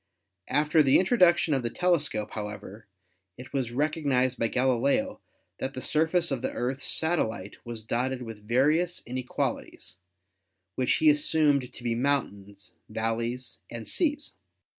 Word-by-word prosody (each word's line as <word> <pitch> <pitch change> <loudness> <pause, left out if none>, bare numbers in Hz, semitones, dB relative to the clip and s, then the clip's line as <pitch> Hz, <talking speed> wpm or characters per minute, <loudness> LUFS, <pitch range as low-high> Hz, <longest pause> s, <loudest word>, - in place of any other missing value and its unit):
After 150 +2 +3
the 135 -2 +5
introduction 180 -6 +4
of 135 - +1
the 120 - -2
telescope, 150 -11 0
however, 105 0 -7 0.5
it 125 0 -11
was 130 -4 -1
recog 150 +6 -1
nised 130 -3 +1
by 115 - +2
Galileo 135 - +1 0.4
that 135 +1 -4
the - - -4
surface 160 +3 +2
of 135 -3 -1
the - - -1
Earth's 130 +3 -3
satellite 115 - 0
was 115 -2 -6
dotted 125 +3 -1
with 110 -3 -10
various 155 +9 +2
inequalities, 125 -6 -4 0.7
which 130 -1 +1
he 310 -1 +5
assumed 150 - +2
to 120 - -13
be 120 -1 0
mountains, 105 -6 -2 0.2
valleys 115 +3 -3
and 115 -1 -7
seas. 295 -4 -1
130 Hz, 140 wpm, -27 LUFS, 115-155 Hz, 0.7 s, the